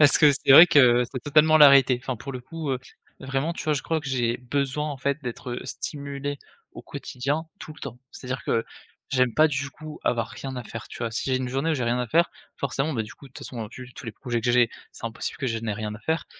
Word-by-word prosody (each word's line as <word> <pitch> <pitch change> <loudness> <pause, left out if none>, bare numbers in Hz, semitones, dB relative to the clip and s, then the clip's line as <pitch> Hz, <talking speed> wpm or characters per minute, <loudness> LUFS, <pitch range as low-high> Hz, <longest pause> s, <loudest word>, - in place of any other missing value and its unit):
Parce 145 -1 +7
que 150 - +7
c'est 135 0 +3
vrai 165 +5 +11
que 125 -6 +5
c'est 130 - -5
totalement 155 +2 +5
la 145 -1 +10
réalité. 135 -2 +5
Enfin 130 -3 -3
pour 135 +5 -7
le 125 - -5
coup, 160 +3 -5
heu, 130 - 0 0.4
vraiment, 135 +5 -1
tu - - -7
vois, 155 - +2
je 140 -2 -1
crois 160 -1 -1
que 145 - -6
j'ai 120 -3 0
besoin, 140 +4 -2
en 145 - -5
fait, 140 +3 -2
d'être 125 0 -5
stimulé 140 -1 -5 0.3
au - - -10
quotidien 140 +6 -3
tout 155 - -9
le - - -17
temps. 120 - -7
C'est-à-dire 130 0 -6
que 115 0 +1 0.5
j'aime 125 -3 +2
pas 155 +1 +5
du 145 0 -3
coup 155 0 -10
avoir 115 -2 +1
rien 135 -1 -7
à 125 - -5
faire, 115 0 -8
tu - - -10
vois? 115 -1 -2
Si 120 - -2
j'ai 130 - +3
une 130 -1 -2
journée 135 +6 -1
où - - +2
j'ai 130 - -2
rien 120 +1 +1
à 125 - -1
faire, 170 +9 +3 0.3
forcément 140 +2 -1
bah, 115 - -1
du 110 +1 -9
coup 140 - -15
de 130 - -19
toute - - -10
façon 115 -4 -5
vu 125 -1 -10
tous - - -11
les 115 - -4
projets 120 +1 -3
que 120 +1 +1
j'ai, 120 -1 +4 0.2
c'est - - -12
impossible 115 0 -4
que 135 - -1
je 115 -1 -1
n'ai 110 -2 -3
rien 105 0 -4
à - - -13
faire. 160 +7 -2
130 Hz, 265 wpm, -25 LUFS, 120-145 Hz, 0.5 s, vrai